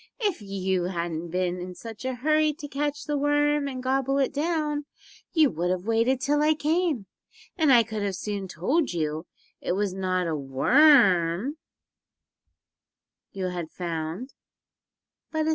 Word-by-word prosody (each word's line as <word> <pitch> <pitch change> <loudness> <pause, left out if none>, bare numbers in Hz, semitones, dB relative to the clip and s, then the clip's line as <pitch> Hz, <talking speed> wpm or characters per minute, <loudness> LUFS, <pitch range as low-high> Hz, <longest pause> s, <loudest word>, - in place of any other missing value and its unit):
If 410 - -1
you 190 -2 -1
hadn't 170 -2 -3
been 180 +1 -1
in 180 0 -7
such 225 +3 -9
a 260 -1 -1
hurry 305 +4 +2
to 295 0 -8
catch 290 +1 -2
the 295 -2 -1
worm 290 0 +2
and 255 -2 -5
gobble 270 +1 +1
it 275 -2 +1
down 300 -1 -1 0.5
you 315 -4 +4
would 170 +2 -1
have 180 0 -1
waited 230 +3 +2
till 290 +2 +1
I 310 +1 +4
came, 310 - 0 0.5
and 315 -6 +3
I 240 -3 +7
could 210 -3 -3
soon 200 0 -4
have - - -11
told 260 - 0
you 155 0 -2 0.3
it - - -1
was 200 0 -1
not 185 -1 -1
a 165 -2 -1
worm 190 - +4 1.7
you 185 -2 -3
had 175 -3 -5
found, 170 - -5 1.0
but 315 - -1
a - - +2
snake." 310 - 0
230 Hz, 160 wpm, -26 LUFS, 180-290 Hz, 1.7 s, I